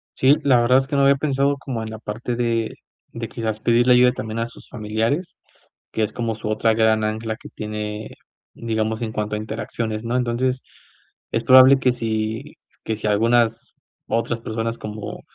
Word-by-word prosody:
Sí, 135 +3 +5
la 130 -4 +5
verdad 120 +2 +4
es 135 - 0
que, 145 - -4
no 140 - +3
había 140 0 +5
pensado 140 0 +1
como 130 -4 -5
en 110 - -5
la 110 - -7
parte 115 +3 -4
de 115 -2 0 0.4
de 115 -1 -5
quizás 110 -2 -3
pedirle 120 +2 +4
ayuda 125 0 +5
también 110 -2 -5
a 115 - 0
sus 115 - -14
familiares, 115 - -2 0.5
que 110 - -1
es 110 0 -1
como 115 -2 -2
su 110 0 -6
otra 110 +1 +2
gran 110 -1 +3
ancla 110 +1 -2
que - - -12
tiene, 105 0 -5 0.4
digamos, 110 -1 -2
en 115 -2 -3
cuanto 105 0 -2
a - - -1
interacciones, 110 0 -4
¿no?, 120 +2 -1
entonces, 125 +1 0 0.7
es 115 - 0
probable 130 +1 +8
que 130 -1 +2
si 110 +3 -3 0.3
que 110 - -2
si 110 - -5
algunas 115 +2 +2 0.3
otras 115 0 -1
personas 115 +1 -3
como 105 -1 -7
115 Hz, 185 wpm, -22 LUFS, 110-125 Hz, 0.7 s, probable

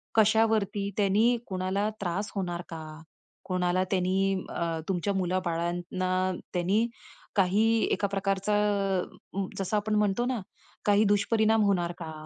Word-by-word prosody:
कशावरती 220 -2 +3
त्यांनी 215 +4 +3
कोणाला 190 +2 -1
त्रास 200 +3 -2
होणार 175 -2 -2
का? 160 -1 -6 0.6
कोणाला 185 0 +1
त्यांनी, 190 +1 +2 0.2
अ, 165 -1 -2
तुमच्या 190 +2 0
मुलाबाळांना 180 -1 -1 0.4
त्यांनी 195 +6 +2 0.5
काही 195 +3 +3 0.3
एका 200 - +1
प्रकारचा 195 +1 0 1.0
जसं 195 +2 0
आपण 210 +1 0
म्हणतो 210 +3 +2
ना, 250 -3 -1 0.4
काही 205 0 +5
दुष्परिणाम 220 +1 +3
होणार 175 -4 +1
का? 160 -2 -6
195 Hz, 115 wpm, -28 LUFS, 180-210 Hz, 1.0 s, काही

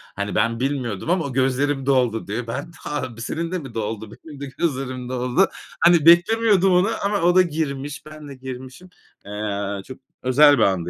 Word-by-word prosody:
Hani, 100 +1 -3
ben 115 +2 +1
bilmiyordum 130 - -2
ama 175 -2 +1
o: 140 - -5
"Gözlerim 135 +1 0
doldu 125 -5 +1
diyor." 115 +4 -4
Ben 140 +8 -5
ha 130 -6 -5
b - - -8
"Senin 165 +8 -3
de 185 - -1
mi 135 -7 -10
doldu? 110 -1 -4
Benim 145 +5 -12
de - - -3
gözlerim 130 -5 -2
doldu." 125 +8 +1 0.3
Hani, 170 -2 +5
beklemiyordum 195 +2 +5
onu 180 +4 +3 0.2
ama 205 -2 0
o 175 +1 +3
da 185 - +8
girmiş. 145 -3 -4
Ben 155 -1 -11
de 140 - -9
girmişim. 130 +6 -9 0.4
Eee, 100 -1 -4
çok 130 - -10 0.2
özel 145 +3 +6
bir 115 - +3
andı 90 -3 +1
135 Hz, 185 wpm, -22 LUFS, 115-165 Hz, 0.4 s, da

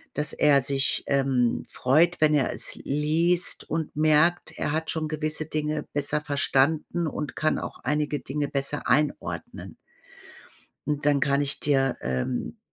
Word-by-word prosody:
dass 150 +1 -1
er 145 -2 +4
sich, 135 0 -1
ähm, 135 -4 +1
freut, 160 +7 +2
wenn 155 -1 +4
er 145 -2 +2
es - - -4
liest 160 +5 0
und 160 0 -3
merkt: 155 +3 +2
Er - - -1
hat 160 +1 -2
schon 160 -1 -1
gewisse 155 0 -2
Dinge 150 0 -2
besser 145 +1 0
verstanden 150 +3 +1
und 150 -2 -5
kann 155 - +1
auch - - -6
einige 150 +2 0
Dinge 145 +2 -3
besser 140 +1 -3
einordnen. 150 0 -1 1.1
Und 150 -1 -2
dann 145 -1 +4
kann 140 +1 +2
ich 145 0 -1
dir, 135 -3 +1
ähm, 65 -1 -3
150 Hz, 145 wpm, -26 LUFS, 140-155 Hz, 1.1 s, er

